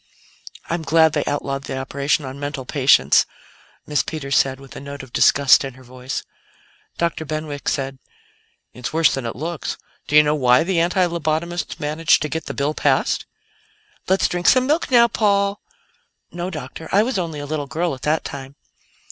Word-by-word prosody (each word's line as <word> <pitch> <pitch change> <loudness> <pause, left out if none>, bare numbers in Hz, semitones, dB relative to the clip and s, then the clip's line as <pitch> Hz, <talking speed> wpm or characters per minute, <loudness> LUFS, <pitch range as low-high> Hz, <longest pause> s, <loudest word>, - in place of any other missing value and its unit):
"I'm 170 0 -2
glad 160 +1 +4
they 150 - 0
outlawed 140 -1 -3
the 130 - -4
operation 140 +2 -1
on 130 +1 -7
mental 145 -2 -5
patients," 130 - +4 0.6
Miss 150 -1 +1
Peters 140 -4 -3
said, 135 0 +2
with 135 -1 -13
a - - -6
note 140 0 -8
of 130 - -14
disgust 140 -1 +5
in 135 -2 -6
her 130 - -15
voice. 130 +1 -6 0.7
Dr. 170 -1 -1
Benwick 155 -2 -4
said: 135 -1 -3 0.7
"It's 125 - -5
worse 160 -1 +3
than 130 -3 -3
it 115 - -5
looks. 160 +4 -4 0.3
Do 150 - -1
you 150 - +9
know 150 0 +1
why 130 0 +4
the 175 0 0
anti 180 +2 +2
lobotomists 170 0 -2
managed 150 +1 +2
to 150 - -3
get 160 +3 -4
the - - -5
bill 145 +2 0
passed?" - - +1 0.8
"Let's 190 +1 +3
drink 175 0 -2
some 255 0 +5
milk 305 +5 0
now, 240 -2 +6
Paul. 200 -3 +1 0.7
No, 175 +1 -4
Doctor; 155 -1 -8
I 205 +2 +4
was 245 -3 -1
only 165 -4 -4
a 145 - -5
little 145 -1 -3
girl 165 +3 -1
at 130 - -9
that 155 +1 0
time." 135 0 -8
150 Hz, 180 wpm, -21 LUFS, 135-170 Hz, 0.8 s, you